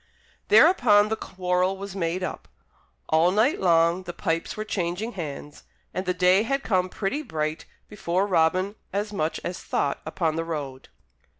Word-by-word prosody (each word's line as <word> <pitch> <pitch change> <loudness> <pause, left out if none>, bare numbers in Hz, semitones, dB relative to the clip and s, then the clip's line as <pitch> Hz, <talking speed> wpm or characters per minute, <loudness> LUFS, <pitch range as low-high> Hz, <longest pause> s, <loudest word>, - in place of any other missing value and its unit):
Thereupon 245 - +5
the 220 - 0
quarrel 185 -1 -1
was 200 0 -7
made 180 0 -2
up. - - -5 0.6
All 160 +2 +4
night 220 +9 +2
long 170 0 +3
the 175 -2 -7
pipes 165 0 -2
were 215 - -3
changing 190 +3 -2
hands, 150 -6 -7 0.3
and 185 0 -4
the 180 - +2
day 180 +2 +4
had 275 +5 -1
come 185 -3 +1
pretty 215 +11 -2
bright 155 - -3 0.2
before 190 -2 -1
Robin 185 +1 +2 0.2
as 205 +2 -2
much 160 -5 -1
as 175 - -4
thought 140 - -1
upon 160 0 -1
the 165 - -1
road. 145 -5 -6
185 Hz, 160 wpm, -25 LUFS, 165-205 Hz, 0.6 s, Thereupon